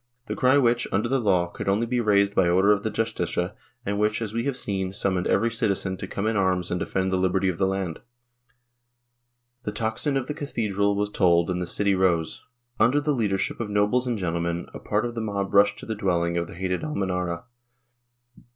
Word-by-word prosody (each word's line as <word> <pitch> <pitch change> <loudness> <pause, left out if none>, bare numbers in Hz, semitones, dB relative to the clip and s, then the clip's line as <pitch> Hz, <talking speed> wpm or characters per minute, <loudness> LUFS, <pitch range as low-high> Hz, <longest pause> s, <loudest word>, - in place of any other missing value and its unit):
— 125 0 -49
the - - -4
cry 130 +2 +4
which, 120 -2 +2
under 100 +5 +1
the 135 +2 +1
law, 95 -6 +2
could 85 +2 -5
only 105 +4 +2
be 120 +1 0
raised 100 -2 +3
by 95 -3 +3
order 95 +4 +4
of 105 -2 +2
the 110 - -2
Justicia 105 -6 -1 0.3
and 100 +1 -1
which, 105 +1 +1
as 110 -2 -4
we 115 +1 -1
have 140 -2 -1
seen, 95 -5 -2
summoned 95 -2 0
every 115 0 +2
citizen 100 -4 -1
to 95 - -6
come 100 +2 -3
in 110 +1 +1
arms 95 -2 +1
and 90 - 0
defend 95 +1 -1
the 95 - +1
liberty 95 +1 +1
of 85 - -4
the 95 - +3
land. 95 -4 -2 1.6
The - - -4
tocsin 115 +6 -1
of 135 - -2
the 150 - -4
cathedral 105 -9 -1
was 105 +1 -1
tolled 85 -3 +3
and 90 0 -2
the 90 - -3
city 100 +2 +1
rose. 90 -4 +1 0.4
Under 130 +5 +4
the 150 +1 0
leadership 100 -6 -1
of 115 -3 -3
nobles 105 +5 +2
and 120 -2 0
gentlemen, 85 -2 -2
a - - -7
part 105 +3 -1
of 120 - -3
the 115 - -3
mob 100 -2 -3
rushed 100 0 +5
to - - -9
the 110 - -3
dwelling 85 -5 0
of 85 -1 -1
the - - -11
hated 90 0 -2
Almenara. 90 - -2
100 Hz, 215 wpm, -25 LUFS, 90-115 Hz, 1.6 s, rushed